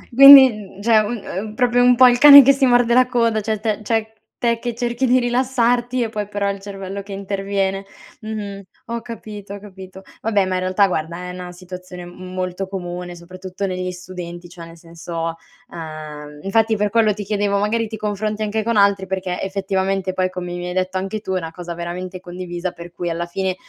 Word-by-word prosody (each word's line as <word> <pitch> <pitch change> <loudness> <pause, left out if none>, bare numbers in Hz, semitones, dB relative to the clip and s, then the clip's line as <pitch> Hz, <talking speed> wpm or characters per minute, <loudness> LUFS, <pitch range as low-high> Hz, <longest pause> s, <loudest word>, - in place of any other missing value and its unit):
Quindi 275 0 +11
n 200 -2 -11
cioè, 220 0 +4
un 215 +3 -1
uhm, 210 +3 -5
proprio 245 0 +2
un 245 0 +6
pò 255 +1 +7
il 245 - +2
cane 285 +2 +11
che 275 +1 +6
si 275 0 +2
morde 245 -1 +3
la 255 +1 +5
coda 230 -3 +1
cioè, 215 0 -2
te 215 0 -1
cioè 220 0 -1 0.3
te 235 -1 +1
che 240 -1 -4
cerchi 240 +2 -1
di 250 +1 +4
rilassarti, 245 0 +1
e 225 - -3
poi 210 -2 -4
però 205 -1 -2
il 200 - -7
cervello 195 0 -7
che 200 +1 -12
interviene. 195 0 -2 0.4
Mh-mh, 210 -2 -6 0.3
ho 235 0 -4
capito 210 -4 -9
ho - - -9
capito. 190 -1 -12 0.2
Vabbè 210 -3 +1
ma 185 - -2
in - - 0
realtà, 185 +2 +2
guarda, 170 -1 -3
è - - -5
una 180 0 -8
situazione 180 0 -10
m 185 +1 -10
molto 185 +1 -3
comune, 180 -2 -6
soprattutto 185 +2 -7
negli 185 -1 -3
studenti; 180 -1 -9
cioè 170 -1 -11
nel 165 0 -14
senso, 165 0 -6 0.4
ehm 150 -2 -8
infatti 220 +3 +2
per 210 -1 -1
quello 220 -1 +3
ti 205 - -5
chiedevo 205 0 0
"magari 220 +3 0
ti 220 - -7
confronti 210 0 -3
anche 215 +1 -1
con 230 0 -1
altri," 200 -1 +3
perché 185 -1 -3
effettivamente 195 -1 -1
poi 185 0 0
come 180 -1 -6
mi 175 0 -5
hai 180 - -4
detto 185 0 -1
anche 195 +3 -4
tu 195 -3 -5
è 185 - +1
una 165 -2 -7
cosa 175 0 -7
veramente 180 +2 -6
condivisa 180 0 -5
per 170 0 -11
cui 175 0 -4
alla 170 +1 -3
fine 185 +1 -2
195 Hz, 210 wpm, -20 LUFS, 180-220 Hz, 0.4 s, Quindi